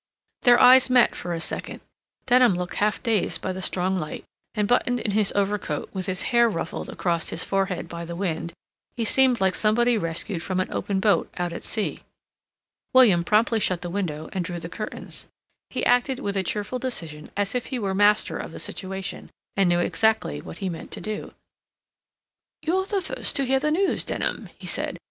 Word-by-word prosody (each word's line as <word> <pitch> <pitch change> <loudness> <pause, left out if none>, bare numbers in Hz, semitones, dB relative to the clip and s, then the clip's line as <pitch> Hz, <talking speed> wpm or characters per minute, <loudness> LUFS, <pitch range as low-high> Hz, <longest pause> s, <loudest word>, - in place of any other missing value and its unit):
Their 245 -2 +6
eyes 255 +1 +7
met 250 -1 +5
for 175 - -5
a 170 - -2
second. - - -3 0.5
Denham 245 -5 +5
looked 180 0 -4
half 210 +1 0
dazed 225 -5 +1
by 185 - -3
the 190 - -6
strong 185 +1 0
light, 155 -5 -5 0.3
and, 210 -2 +1
buttoned 245 +1 +2
in 210 - -2
his 205 0 +3
overcoat, 200 -6 -1
with 190 -1 -4
his 185 -1 0
hair 235 0 +5
ruffled 165 -5 -4
across 170 -2 -1
his 165 - -1
forehead 195 -2 -1
by 170 0 -6
the 170 0 -6
wind, 170 -2 -2 0.5
he 230 - 0
seemed 255 +1 +4
like 190 -1 +2
somebody 230 +3 +3
rescued 165 +1 -2
from 185 +1 -2
an 185 - -2
open 195 -2 -1
boat 205 +1 +2
out 175 -1 -2
at - - -7
sea. 215 -2 -2 0.9
William 220 -10 +6
promptly 220 +5 +3
shut 185 -4 0
the 175 - -4
window 160 -6 -3
and 185 - -1
drew 175 0 -5
the 165 - -6
curtains. 215 +3 -4 0.4
He - - -2
acted 245 +2 +3
with 200 -7 -3
a 195 - +2
cheerful 210 +6 -3
decision 165 -12 -4
as 205 -1 0
if 250 -1 -2
he 260 - -3
were 200 -5 -2
master 205 +2 +3
of - - -6
the - - -9
situation, 190 0 -4 0.3
and 195 -3 +3
knew 175 0 +3
exactly 220 - +1
what 80 +1 -9
he 195 - -3
meant 165 - -7
to - - -5
do. 215 -1 -5 1.3
"You're 375 +4 0
the 400 -2 0
first - - -1
to 275 - +1
hear 265 +1 +3
the 300 +2 0
news, 365 +5 +2
Denham," - - -3
he - - -11
said. - - -2
200 Hz, 195 wpm, -24 LUFS, 180-240 Hz, 1.3 s, eyes